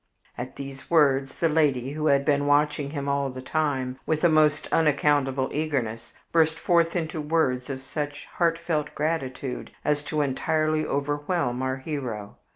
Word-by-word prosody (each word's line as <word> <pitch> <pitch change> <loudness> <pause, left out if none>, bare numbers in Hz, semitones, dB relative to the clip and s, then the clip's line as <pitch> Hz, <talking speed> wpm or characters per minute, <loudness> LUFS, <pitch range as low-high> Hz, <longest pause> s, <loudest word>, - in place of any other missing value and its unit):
At 125 +1 -6
these 135 -1 -8
words 140 -4 +3
the 165 - +2
lady, 140 -5 +1
who 155 +1 -1
had 140 -1 +3
been 145 -1 +2
watching 145 0 +2
him 140 -1 -4
all 140 -1 0
the 130 0 -7
time 135 -4 -1
with 155 0 0
a 175 - +6
most 155 -1 +3
unaccountable 145 -3 +2
eagerness, 125 -7 -2 0.2
burst 160 -1 +3
forth 170 0 +2
into 160 -2 -2
words 150 -5 0
of 130 -1 -5
such 145 +1 -4
heartfelt 165 -3 0
gratitude 140 -4 -2 0.2
as 150 0 +1
to 155 0 -1
entirely 155 +3 +1
overwhelm 145 -2 -1
our 130 0 -1
hero. 130 -8 -5
145 Hz, 155 wpm, -26 LUFS, 135-155 Hz, 0.2 s, a